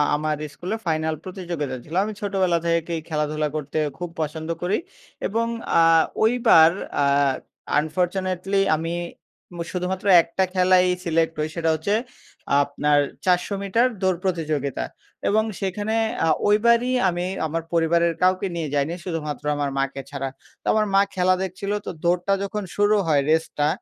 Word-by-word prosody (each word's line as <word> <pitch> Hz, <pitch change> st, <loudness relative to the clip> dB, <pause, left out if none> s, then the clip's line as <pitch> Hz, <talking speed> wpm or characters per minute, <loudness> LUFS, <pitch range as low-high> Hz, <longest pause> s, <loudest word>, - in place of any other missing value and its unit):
আমার 155 Hz, +1 st, -1 dB, 0.2 s
স্কুলে 180 Hz, +8 st, -4 dB
ফাইনাল 160 Hz, -1 st, 0 dB
প্রতিযোগিতা 175 Hz, -7 st, -4 dB
ছিল। 160 Hz, -, -8 dB
আমি 215 Hz, +1 st, -4 dB
ছোটবেলা 190 Hz, -4 st, +1 dB
থেকেই 170 Hz, 0 st, 0 dB
খেলাধুলা 150 Hz, -1 st, -1 dB
করতে 150 Hz, 0 st, -4 dB, 0.2 s
খুব 175 Hz, 0 st, -5 dB
পছন্দ 160 Hz, +1 st, -4 dB
করি 180 Hz, +4 st, +1 dB, 0.5 s
এবং 230 Hz, +3 st, 0 dB, 0.3 s
আ -, -, +6 dB, 0.4 s
ওইবার 220 Hz, -9 st, +6 dB, 0.3 s
আ -, -, +3 dB, 0.7 s
আনফরচুনেটলি 185 Hz, +4 st, -1 dB, 0.2 s
আমি 165 Hz, +2 st, -3 dB, 0.6 s
উম 175 Hz, -, -9 dB
শুধুমাত্র 185 Hz, +2 st, -3 dB, 0.2 s
একটা 170 Hz, +3 st, -1 dB
খেলায়ই 185 Hz, -1 st, +4 dB
সিলেক্ট 165 Hz, -1 st, +1 dB
হই। 155 Hz, -, 0 dB
সেটা 165 Hz, -1 st, 0 dB
হচ্ছে 160 Hz, +6 st, -1 dB, 0.7 s
আপনার 145 Hz, +1 st, +1 dB, 0.3 s
৪০০ 180 Hz, +2 st, +2 dB
মিটার 225 Hz, +6 st, +2 dB
দৌড় 185 Hz, -2 st, +2 dB
প্রতিযোগিতা। 155 Hz, -7 st, -1 dB, 0.4 s
এবং 215 Hz, +2 st, +3 dB, 0.2 s
সেখানে 205 Hz, +3 st, -2 dB, 0.3 s
আ -, -, +2 dB, 0.2 s
ওইবারই 235 Hz, +4 st, +4 dB, 0.2 s
আমি 175 Hz, 0 st, -2 dB, 0.2 s
আমার 165 Hz, +2 st, -3 dB
পরিবারের 170 Hz, 0 st, +3 dB
কাউকে 185 Hz, +1 st, +3 dB
নিয়ে 160 Hz, -4 st, -3 dB
যাইনি, 145 Hz, +3 st, 0 dB
শুধুমাত্র 150 Hz, -6 st, -4 dB
আমার 145 Hz, -1 st, -1 dB
মাকে 135 Hz, 0 st, -1 dB
ছাড়া। 135 Hz, -1 st, -4 dB, 0.3 s
তো -, -, -63 dB
আমার 215 Hz, 0 st, +2 dB
মা 195 Hz, -, +7 dB
খেলা 185 Hz, 0 st, +3 dB
দেখছিলো। 195 Hz, +2 st, -3 dB
তো -, -, -3 dB
দৌড়টা 175 Hz, +3 st, +2 dB
যখন 210 Hz, +1 st, -3 dB
শুরু 205 Hz, +1 st, +3 dB
হয়, 145 Hz, -3 st, +3 dB
রেসটা 160 Hz, -2 st, +1 dB
175 Hz, 145 wpm, -23 LUFS, 155-190 Hz, 0.7 s, মা